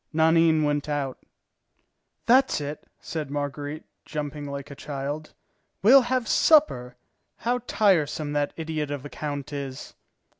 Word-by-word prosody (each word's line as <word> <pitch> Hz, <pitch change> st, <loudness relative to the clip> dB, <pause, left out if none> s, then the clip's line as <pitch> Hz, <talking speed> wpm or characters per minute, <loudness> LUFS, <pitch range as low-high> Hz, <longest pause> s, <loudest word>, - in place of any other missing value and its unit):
Nanine 160 Hz, 0 st, +4 dB
went 145 Hz, 0 st, 0 dB
out. 140 Hz, -3 st, -2 dB, 1.1 s
"That's 260 Hz, -2 st, +4 dB
it," 145 Hz, +1 st, -6 dB
said 155 Hz, -4 st, -5 dB
Marguerite, 145 Hz, +1 st, -4 dB, 0.2 s
jumping 145 Hz, -1 st, -5 dB
like 140 Hz, 0 st, -6 dB
a -, -, -8 dB
child, 145 Hz, +2 st, -5 dB, 0.5 s
"we'll 260 Hz, +6 st, +8 dB
have 250 Hz, -1 st, -1 dB
supper. 125 Hz, -, +4 dB, 0.4 s
How 245 Hz, +2 st, 0 dB
tiresome 155 Hz, -7 st, +2 dB
that 145 Hz, -1 st, 0 dB
idiot 160 Hz, -2 st, -3 dB
of 145 Hz, -1 st, -5 dB
a -, -, -6 dB
count 145 Hz, -1 st, -5 dB
is!" 135 Hz, -2 st, -6 dB
150 Hz, 125 wpm, -26 LUFS, 145-160 Hz, 1.1 s, we'll